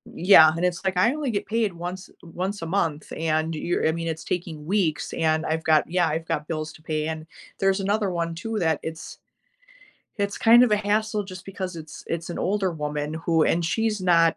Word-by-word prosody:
yeah, 165 -3 +7
and 175 - 0
it's 180 +1 -1
like, 190 -1 0
"I 230 +8 +4
only 300 -3 -2
get 200 - -2
paid 220 -2 0
once 180 +2 -6
once 185 +3 -4
a - - -2
month, 165 -4 -1
and 160 0 0
you're 170 +1 0
I - - +3
mean, 165 0 -4
it's 160 -1 -4
taking 165 -4 -4
weeks, 180 -5 0
and 160 -1 +1
I've 160 +1 -1
got," 155 -1 +3
Yeah 175 -1 +2
"I've 160 +1 -2
got 150 0 -2
bills 155 -1 -4
to 155 - -16
pay," 155 -1 -2
and 160 0 -5 0.3
there's 195 0 +2
another 205 0 0
one 170 -1 -2
too 225 +5 -4
that 160 -3 +1
it's 160 0 -7 1.0
it's 200 0 -1
kind 235 +2 +7
of 245 - +4
a 210 - +4
hassle 210 +1 0
just 185 0 -10
because 190 -2 -5
it's 155 -1 -10
it's 165 0 -4
an - - -5
older 195 -1 0
woman 150 -1 -3
who 165 0 +1
and 170 0 +1
she's 210 +6 0
not, 165 -3 +4
170 Hz, 215 wpm, -24 LUFS, 160-195 Hz, 1.0 s, yeah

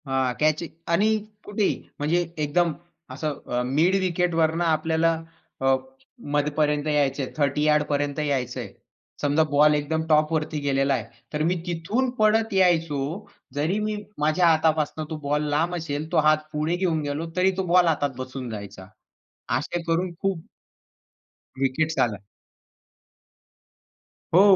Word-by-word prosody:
हां, 130 -1 +1
कॅच 155 +2 +2 0.3
आणि 195 +6 +3 0.4
कुठेही 205 0 0 0.2
म्हणजे 160 +4 +2 0.2
एकदम 170 +3 +2 0.4
असं 150 +1 -3
अ, 125 - +1
मिड 155 +9 +2
विकेटवरनं 170 -2 +1
आपल्याला 160 +1 +2 0.5
अ, 135 0 +4 0.6
मध्यापर्यंत 150 0 +1
यायचंय. 145 -2 +1
30 145 0 +1
यार्डपर्यंत 150 -1 +1
यायचंय. 130 -5 -2 0.5
समजा 145 +2 +3
बॉल 150 +1 +5
एकदम 155 +2 -1
टॉपवरती 155 0 +2
गेलेला 140 -1 +1
आहे. 120 - -1 0.3
तर 150 0 0
मी 175 +3 +2
तिथून 185 +10 -1
पळत 220 0 +3
यायचो. 165 -6 +3 0.5
जरी 155 +7 0
मी 215 0 -1 0.2
माझ्या 155 +4 +3
हातापासून 155 -1 +2
तो 160 - -4
बॉल 150 +1 +1
लांब 165 +5 +1
असेल, 155 -2 -4
तो - - +1
हात 155 0 +6 0.2
पुढे 155 +3 0
घेऊन 175 -4 0
गेलो 145 +2 -3
तरी 185 +1 +4
तो 190 - 0
बॉल 180 +1 +5
हातात 145 -4 0
बसून 130 -1 -6
जायचा. 100 -3 -8 0.7
असे 175 - -3
करून 170 +2 0
खूप 190 -4 -2 1.1
विकेट्स 155 +4 0
आला. 105 -5 -6 2.1
हो 180 - +8
155 Hz, 130 wpm, -25 LUFS, 145-170 Hz, 2.1 s, हो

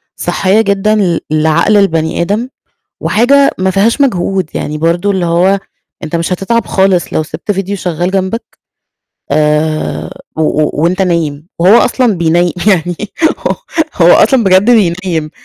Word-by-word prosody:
صحّية 195 +3 +1
جدًا 200 0 +1
ل 180 -5 +1
لعقل 155 +7 +2
البني 165 -5 0
آدم، 210 +8 -2 0.5
وحاجة 275 +6 +3
ما 190 0 0
فيهاش 225 +8 +1
مجهود، 190 - 0
يعني 150 - -4
برضو 170 +5 0
اللي 190 -3 -1
هو 180 +4 +2 0.4
أنت 155 +2 -4
مش 170 +2 -1
هتتعب 230 +6 -1
خالص 190 -2 +1
لو 155 - 0
سِبت 155 +7 -5
فيديو 195 +1 -3
شغال 175 -1 -3
جنبك، 195 +4 -3 0.7
آآ 150 +1 0 0.3
و 160 - -1
و 155 0 +1
وأنت 175 +5 0
نايم، 165 -4 -2
وهو 180 +5 +5
أصلًا 245 -3 +1
بينيِّ 170 0 +1
يعني، 175 -4 +1 0.4
هو - - -2 0.4
هو 175 -1 +5
أصلًا 235 +1 +3
بجد 190 +4 +4
بينِّيم. 175 -7 0
185 Hz, 145 wpm, -12 LUFS, 165-200 Hz, 0.7 s, وهو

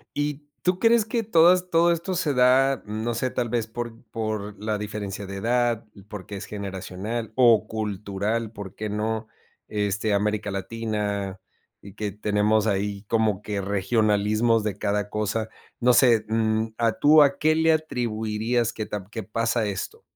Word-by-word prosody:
¿Y 145 0 -2 0.2
tú 180 0 +1
crees 230 0 +4
que 225 +1 -1
todas 180 -1 +4
todo 170 0 +4
esto 170 +3 -2
se 160 -6 0
da, 130 +1 +4
no 110 +3 -3
sé, 125 +3 -1
tal 120 -2 -2
vez 115 -2 -1
por 115 +1 -6
por 105 -2 -4
la 110 -1 0
diferencia 105 -1 -5
de 100 0 -6
edad, 120 +1 +1 0.2
porque, 105 -1 -8
es - - -7
generacional, 100 +3 -5
o 115 -4 +5
cultural? 105 +1 -2
¿Por 100 -4 -9
qué 110 0 -4
no? 110 +1 -2 0.4
Este, 105 0 -1
América 105 0 0
Latina 100 -1 -3 0.4
y 100 - -12
que 105 0 -3
tenemos 105 +1 +1
ahí 100 0 -1
como 110 -2 +1
que 100 -1 -3
regionalismos 105 +3 +2
de 100 -2 -2
cada 105 0 -1
cosa, 105 +1 -2 0.3
no 125 0 +4
sé, 115 -4 +5
mm, 110 0 0
a 115 -1 +2
tú, 150 +1 +7
¿a 140 -1 +4
qué 155 +1 +3
le 160 0 +4
atribuirías 115 -5 -1
que 110 - -4
ta 105 -3 -5
que 110 -2 -5
pasa 115 +1 0
esto? 100 -2 -5
110 Hz, 160 wpm, -25 LUFS, 105-120 Hz, 0.4 s, tú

